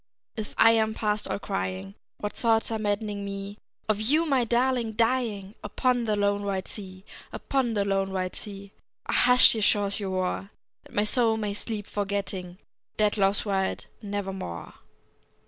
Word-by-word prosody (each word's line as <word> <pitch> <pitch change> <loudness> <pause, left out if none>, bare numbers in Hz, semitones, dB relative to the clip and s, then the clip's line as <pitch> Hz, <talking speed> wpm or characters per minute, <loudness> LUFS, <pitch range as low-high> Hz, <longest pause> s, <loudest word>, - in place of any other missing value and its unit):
If 215 -2 -6
I 225 - +7
am 220 -1 +2
past 210 -1 0
all - - 0
crying, 95 - -3 0.2
What 210 0 -4
thoughts 225 -1 +2
are 220 - -1
maddening 205 -1 -1
me, 200 +1 -6 0.3
Of 215 -1 +1
you, 300 +9 +3
my 270 -5 +3
darling, 240 -1 +1
dying 225 -4 0
Upon 245 +3 +1
the 215 -1 +1
lone, 205 0 +1
wide 195 -2 -2
sea, 190 -2 -9 0.3
Upon 255 -4 -1
the 200 -1 +1
lone, 195 -1 0
wide 185 -1 -2
sea, 200 -2 -7 0.3
Ah! - - -2
hush, 250 0 +6
ye 220 - -2
shores, 205 -1 +2
your 200 -2 -3
roar, 185 +1 -1 0.4
That - - -15
my 205 - +3
soul 225 0 +3
may 210 -2 -2
sleep, 210 0 -4
forgetting 200 -3 -3 0.4
Dead 210 -1 +3
Love's 195 0 +2
wild 195 -2 -1 0.2
Nevermore! 195 - -5
205 Hz, 165 wpm, -27 LUFS, 195-225 Hz, 0.4 s, I